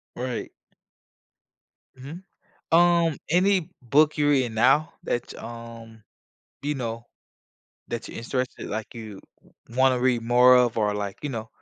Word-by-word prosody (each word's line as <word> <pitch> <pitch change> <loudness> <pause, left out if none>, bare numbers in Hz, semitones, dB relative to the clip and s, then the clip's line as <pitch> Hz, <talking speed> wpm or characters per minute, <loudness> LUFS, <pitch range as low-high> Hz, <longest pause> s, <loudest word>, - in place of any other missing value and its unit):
Right. 125 -1 -4 1.5
Mhm, 150 +8 -9 0.5
um, 170 -2 +4
any 180 0 +2
book 145 +6 +3
you're 145 -1 +2
reading 130 -5 +2
now 135 +8 +3
that 120 - -3
y - - -11
um, 115 -1 -10 0.6
you 145 +1 -2
know, 115 -2 -5 0.8
that 120 -1 -5
you're - - -8
interested 125 +2 -4
like, 110 +3 -5
you 110 -4 -9 0.5
wa 115 - -11
wanna 130 -1 +3
read 125 -2 +1
more 125 +2 +6
of 125 -2 +2
or, 105 -1 +1
like, 100 -1 -4
you 150 - -3
know. 115 -3 -5
125 Hz, 140 wpm, -25 LUFS, 115-145 Hz, 1.5 s, more